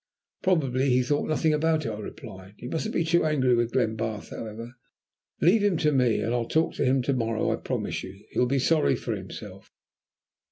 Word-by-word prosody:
"Probably 140 -7 +1
he 125 0 +3
thought 145 +4 0
nothing 155 0 +2
about 155 0 +1
it," - - -1
I 105 -1 -5
replied. 95 -1 -10
"You 125 - -8
mustn't 215 +7 -2
be - - +2
too 165 +1 +2
angry 140 -5 +2
with 120 0 +1
Glenbarth, 110 -3 -1
however. 115 +2 -7 0.7
Leave 200 +7 +4
him 200 -5 +2
to 150 -1 +2
me, 125 -5 +2
and 115 +3 -1
I'll 120 -1 -1
talk 160 +1 +1
to - - +1
him. 130 0 +2
To 140 - +1
morrow, 115 -3 0
I - - 0
promise - - -3
you, 95 +2 -11
he'll 125 - +2
be 135 +2 +1
sorry 155 +4 +3
for - - -3
himself. - - -9
130 Hz, 200 wpm, -26 LUFS, 115-155 Hz, 0.7 s, Leave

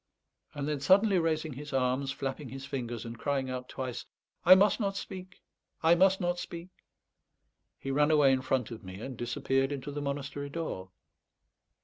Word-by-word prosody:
And 145 0 -3
then 150 -2 -1
suddenly 190 +6 +5
raising 160 -2 0
his 145 +2 -8
arms, 130 +1 +1
flapping 135 0 -4
his 135 +2 -7
fingers, 120 -4 -4
and 115 0 -7
crying 135 -3 -1
out 125 0 -5
twice, 125 -2 -5 0.4
"I 185 +2 +10
must 200 +4 +4
not 195 -2 -1
speak! 185 -2 -8 0.4
I 165 +1 +7
must 190 +2 +4
not 175 -1 0
speak!" 170 +1 -7 1.1
he 135 - -4
ran 145 +2 +3
away 150 -3 +5
in 130 - +1
front 130 -2 0
of 115 - -8
me, 95 +1 -8
and 130 +3 -6
disappeared 135 +3 0
into 145 0 -4
the 145 +1 -4
monastery 140 0 -4
door. 140 - -4
140 Hz, 170 wpm, -30 LUFS, 130-165 Hz, 1.1 s, I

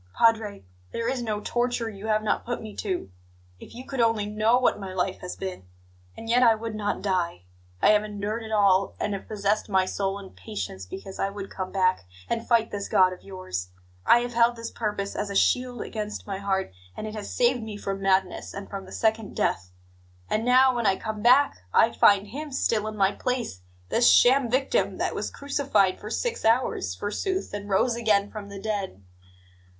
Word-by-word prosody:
Padre, 220 - +2 0.3
there 230 0 -2
is 255 0 -1
no 215 -3 -2
torture 240 +1 -1
you 210 -1 -7
have 215 0 +1
not 215 - 0
put 240 0 -3
me 215 -2 -9
to; 185 - -3 0.5
if - - -13
you 250 +2 -8
could 270 -1 -5
only 225 -3 +2
know 215 +3 +2
what 250 -4 +2
my 190 -2 -6
life 185 +1 -1
has 180 - -6
been! 185 - -6 0.5
And 225 - -8
yet 240 +2 +3
I 230 -3 +6
would 225 0 -5
not 210 -1 -2
die! 180 - -1 0.4
I - - +7
have 210 0 +5
endured 210 +2 -4
it 220 -1 -8
all, 195 -2 +3
and 210 - -1
have 195 - -6
possessed 210 0 -1
my 190 -1 +3
soul 195 +1 -2
in 200 -1 -10
patience, 95 0 -6
because 195 - -8
I 195 - +1
would 200 -1 -7
come 185 -1 -5
back 185 - +1 0.2
and 230 0 -2
fight 230 -2 +3
this 200 -1 -4
God 185 0 +4
of 180 - -12
yours. 185 - -5 0.3
I 240 - +6
have 245 0 -4
held 235 +1 +4
this 230 0 -6
purpose 210 -3 -3
as 205 - -2
a 200 - -5
shield 250 +4 +2
against 210 -2 -5
my 195 -2 -4
heart, 195 - -1 0.3
and - - -4
it 215 - -5
has 210 -2 -6
saved 245 0 +2
me 220 -2 -6
from 195 -1 -4
madness, 190 -1 0
and 200 0 -6
from 195 -1 -6
the - - -13
second 220 -2 0
death. 90 0 0 0.6
And 215 +1 +1
now, 255 +1 +5
when 235 -3 +1
I 195 - +4
come 215 +1 -5
back, 255 +5 +5 0.2
I 230 - +6
find 200 -1 +5
Him 295 +6 -6
still 220 -5 0
in 215 0 -5
my 195 -1 +3
place 240 - -3 0.3
this 240 +1 +5
sham 255 0 +5
victim 270 - +1
that - - -1
was - - -3
crucified 275 -10 +1
for 210 - -7
six 475 - -2
hours, 225 - +1
forsooth, 375 - -3
and 205 0 -5
rose 230 +5 +2
again 210 -4 +2
from 205 -2 -7
the 200 -1 -8
dead! 195 - -4
210 Hz, 205 wpm, -26 LUFS, 195-230 Hz, 0.6 s, I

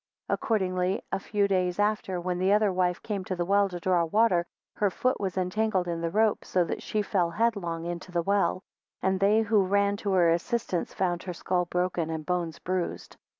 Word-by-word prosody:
13 - - +2
Accordingly 185 -4 0
a 195 - 0
few 205 0 0
days 185 -2 0
after, 205 -3 0
when 180 0 -2
the 190 +2 +2
other 210 -2 +3
wife 180 -1 +1
came 205 -3 -3
to 185 - -3
the 175 -1 -1
well 200 +1 +3
to 180 -1 -6
draw 180 -1 +2
water, 175 -1 +2 0.3
her 205 - +2
foot 255 +7 0
was 190 -2 -2
entangled 185 0 0
in 170 -1 -2
the 165 - -1
rope, 215 +4 +2
so 180 - +1
that 170 - -4
she 210 -1 -1
fell 185 -4 +1
headlong 175 -4 -1
into 175 +1 -5
the 170 -1 0
well, 200 0 +1 0.4
and 190 0 +1
they 210 +3 +4
who 215 -2 +3
ran 200 +1 +2
to 200 -2 -2
her 175 -3 +4
assistance 180 +1 -1
found 175 -2 -1
her 180 - -5
skull 180 +1 -1
broken, 180 -2 -1
and 160 -1 -4
bones 175 -2 -2
bruised. 185 -1 -3
185 Hz, 205 wpm, -27 LUFS, 175-200 Hz, 0.4 s, they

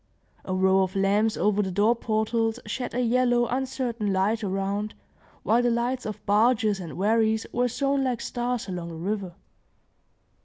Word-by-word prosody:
A 185 - -2
row 190 +1 +4
of 190 +1 -1
lamps 205 +3 +2
over 210 0 +2
the 190 - -2
door 205 +6 +3
portals 225 +1 -1
shed 250 -2 -4
a 250 - +1
yellow, 245 0 +2
uncertain 245 -4 -2
light 205 +4 +1
around, 200 +2 -2 0.5
while 235 +2 +3
the 245 - +2
lights 240 +1 -1
of 215 - -7
barges 215 -1 +3
and 170 -3 -7
wherries 220 +2 +2
were 245 +1 +2
sown 275 +2 0
like 250 -3 -1
stars 245 -1 -3
along 180 -3 -5
the 165 - -8
river. 190 +1 -3
220 Hz, 160 wpm, -26 LUFS, 195-240 Hz, 0.5 s, row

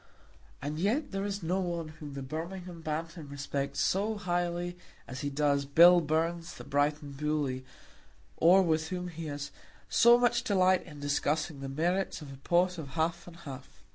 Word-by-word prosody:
And 150 +2 -3
yet 225 - 0
there 195 0 -2
is 200 -2 -3
no 180 +4 0
one 170 -3 -3
whom 150 -2 -9
the 135 - -5
Birmingham 170 +4 -6
Bantam 160 0 -4
respects 140 0 -3
so 205 +3 +1
highly 175 -2 -1 0.3
as 130 +1 -6
he 145 - -1
does 140 0 +1
Bill 170 +5 +7
Burns 165 +2 -1
the - - -9
Brighton 145 +1 0
Bully, 140 -2 -1 0.7
or 185 +4 +6
with 160 -2 +1
whom 180 +1 -4
he 165 -1 -6
has 145 -1 -5 0.4
so 235 +1 +7
much 240 0 +2
delight 185 -5 +3
in 150 -3 -10
discussing 145 +1 -1
the 135 0 -5
merits 175 +7 0
of 145 -3 -9
a - - -11
pot 175 +5 +1
of 150 - -6
half 170 +2 0
and 175 - -11
half. 135 -3 -10
165 Hz, 170 wpm, -30 LUFS, 145-180 Hz, 0.7 s, Bill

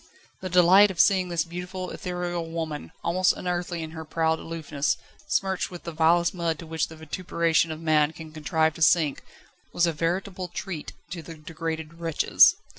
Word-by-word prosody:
The 185 - -5
delight 180 +3 +7
of 185 - -7
seeing 185 -2 +4
this 170 -2 0
beautiful, 180 +2 -6
ethereal 175 -2 -4
woman, 160 -3 -4
almost 180 +2 +3
unearthly 175 -1 -3
in 160 - -7
her 160 0 -7
proud 160 0 0
aloofness, 155 -3 -2 0.3
smirched 190 -1 0
with 175 -1 -9
the 170 - -5
vilest 165 +2 +3
mud 170 -3 -1
to 165 - -9
which 160 0 -1
the 160 - -11
vituperation 165 +1 0
of 155 - -5
man 155 -2 +3
can 160 0 -10
contrive 160 +1 +1
to 165 - -11
sink, 155 -3 +3 0.5
was 175 - +2
a 170 - 0
veritable 180 +4 -2
treat 175 -2 -6 0.2
to 175 - -5
the 165 +1 -10
degraded 160 +1 -6
wretches. 165 -2 +5
165 Hz, 175 wpm, -26 LUFS, 160-180 Hz, 0.5 s, delight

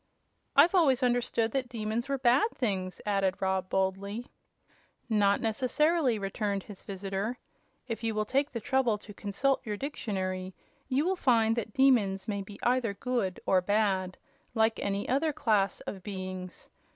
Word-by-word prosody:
"I've 310 +6 +7
always 280 -8 +4
understood 240 -2 +1
that 255 -1 -2
demons 230 +2 -3
were 275 - +1
bad 260 - +4
things," 190 -7 -2
added 195 -2 +1
Rob, 190 -1 0
boldly. 195 +4 -1 0.8
"Not 205 -3 +3
necessarily," 260 +4 +2
returned 200 0 -2
his 205 -3 -10
visitor. 195 +4 -4 0.5
"If 230 -1 -4
you 225 -1 -1
will 215 0 0
take 275 +6 0
the 235 - -3
trouble 250 -3 +1
to 205 0 -12
consult 220 +8 0
your 210 -4 -4
dictionary, 190 -8 -3 0.3
you 275 +4 +1
will 380 +1 +1
find 225 -8 +3
that 225 -2 -4
demons 230 -8 +3
may 200 -2 -2
be 200 +1 -10
either 240 -4 +1
good 235 -6 -2
or 185 -1 +4
bad, 190 -2 +1 0.4
like 220 0 +2
any 200 0 -2
other 285 +5 +1
class 210 -8 +1
of 190 - -6
beings. 185 -2 -6
215 Hz, 150 wpm, -29 LUFS, 195-250 Hz, 0.8 s, I've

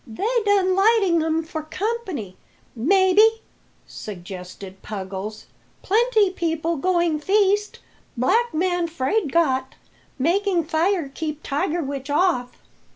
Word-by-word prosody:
"They 240 - -3 0.2
done 380 -2 +3
lighting 390 -4 +3
um 320 0 0
for 315 0 -5
company, 365 - -4 0.4
maybe," 390 - +4 0.4
suggested 190 0 -9
Puggles. 200 +1 -6 0.4
"Plenty 435 -1 +3
people 330 -2 -2
going 345 -1 +1
feast, 405 +4 +1 0.4
black 450 - +2
man 350 +1 0
'fraid 330 +2 -1
got, 265 -6 +1 0.4
making 350 +5 +1
fire 330 +1 0
keep 305 +2 -5
tiger 305 +4 -1
witch 275 0 -5
off." 290 -6 0
335 Hz, 105 wpm, -22 LUFS, 270-390 Hz, 0.4 s, maybe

